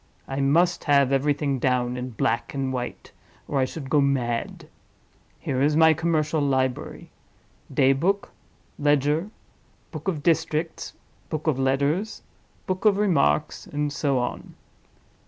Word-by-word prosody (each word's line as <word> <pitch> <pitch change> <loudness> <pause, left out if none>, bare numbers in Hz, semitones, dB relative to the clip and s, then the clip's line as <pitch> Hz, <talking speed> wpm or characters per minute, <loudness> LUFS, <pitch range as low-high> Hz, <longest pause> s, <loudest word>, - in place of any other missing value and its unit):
I 135 0 -4
must 165 +6 +2
have 140 -3 +4
everything 140 0 +1
down 125 -1 0
in 125 0 -4
black 115 +2 -1
and 135 -1 -2
white, 125 -1 -5 0.4
or 140 - -1
I 130 - +3
should 135 +1 -7
go 145 +2 +3
mad! 125 -4 -1 0.7
Here 130 0 -2
is 150 +2 +3
my 160 0 +6
commercial 160 -1 0
library: 130 -2 -1 0.6
Daybook, 145 +9 +2 0.5
Ledger, 150 +5 +2 0.6
Book - - -8
of 160 -6 -2
Districts, 160 -1 -1 0.4
Book 155 -1 -4
of 150 -5 +1
Letters, 140 +10 0 0.4
Book 185 0 -3
of 205 -2 +5
Remarks, 165 - +1
and 145 0 -2
so 140 -2 0
on. 125 0 -4
145 Hz, 130 wpm, -24 LUFS, 130-160 Hz, 0.7 s, my